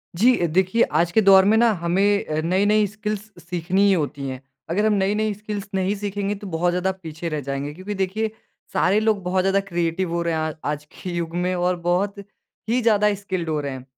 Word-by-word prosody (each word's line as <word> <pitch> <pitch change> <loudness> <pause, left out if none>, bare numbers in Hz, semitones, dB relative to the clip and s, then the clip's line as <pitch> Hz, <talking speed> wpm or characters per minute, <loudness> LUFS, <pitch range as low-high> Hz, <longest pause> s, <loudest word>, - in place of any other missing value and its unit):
जी, 245 +7 +5
देखिए 185 +7 +2 0.2
आज 170 0 +1
के 220 - +4
दौर 195 -1 +7
में 220 +2 +4
ना 235 0 +5
हमें 195 +4 +2
अ, 155 0 -2
नई-नई 205 +5 +3
स्किल्स 210 0 -5
सीखनी 180 +2 -1
ही 200 - +5
होती 145 -5 -2
हैं, 130 -1 -6 0.3
अगर 200 +6 +1
हम 215 - +3
नई-नई 210 +2 +1
स्किल्स 210 0 -6
नहीं 190 +2 0
सीखेंगे, 205 0 -3
तो 200 0 -9
बहुत 175 0 0
ज़्यादा 180 +2 0
पीछे 170 -3 -7
रह 155 -1 -3
जाएँगे। 140 +1 -4
क्योंकि 185 +6 -6
देखिए, 200 +3 -1 0.4
सारे 195 +3 +3
लोग 215 -2 +1
बहुत 185 +1 +1
ज़्यादा 195 +1 +3
क्रिएटिव 170 0 -1
हो 170 - 0
रहे 170 -1 -1
हैं 160 - 0
आ 155 0 -1 0.2
आज 150 0 -5
के 185 - -8
युग 170 -1 -3
में 180 +1 0
और 180 +1 +1
बहुत 180 +4 0 0.5
ही 245 +2 +2
ज़्यादा 210 -2 +3
स्किल्ड 185 -4 -4
हो 155 -1 0
रहे 140 -1 -4
हैं, 130 -1 -7
190 Hz, 215 wpm, -23 LUFS, 170-205 Hz, 0.5 s, दौर